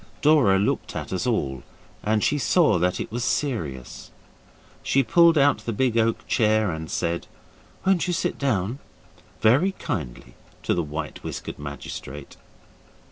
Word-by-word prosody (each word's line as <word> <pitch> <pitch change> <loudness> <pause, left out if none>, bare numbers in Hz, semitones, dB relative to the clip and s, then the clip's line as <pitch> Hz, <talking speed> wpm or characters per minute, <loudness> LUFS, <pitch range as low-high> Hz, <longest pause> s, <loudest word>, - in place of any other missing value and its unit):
Dora 145 -11 +5
looked 100 +2 -1
at - - -4
us 100 +7 -1
all, 70 - -1 0.4
and 105 0 +1
she 145 - +2
saw 155 - +3
that 90 +1 0
it - - -5
was 120 +1 -2
serious. 80 - -3 0.7
She 135 - +2
pulled 170 +4 +5
out 140 -4 +4
the 115 +2 -4
big 125 +1 +1
oak 115 0 +1
chair 110 -3 +2
and 80 0 -6
said, 85 0 -2 0.6
'Won't 190 -2 +2
you 180 - 0
sit - - -1
down?' 120 -2 0 0.6
very 135 - +4
kindly 65 - -5 0.3
to - - +1
the 85 - 0
white 75 0 -6
whiskered - - -6
magistrate. 70 0 -8
110 Hz, 145 wpm, -24 LUFS, 85-140 Hz, 0.7 s, Dora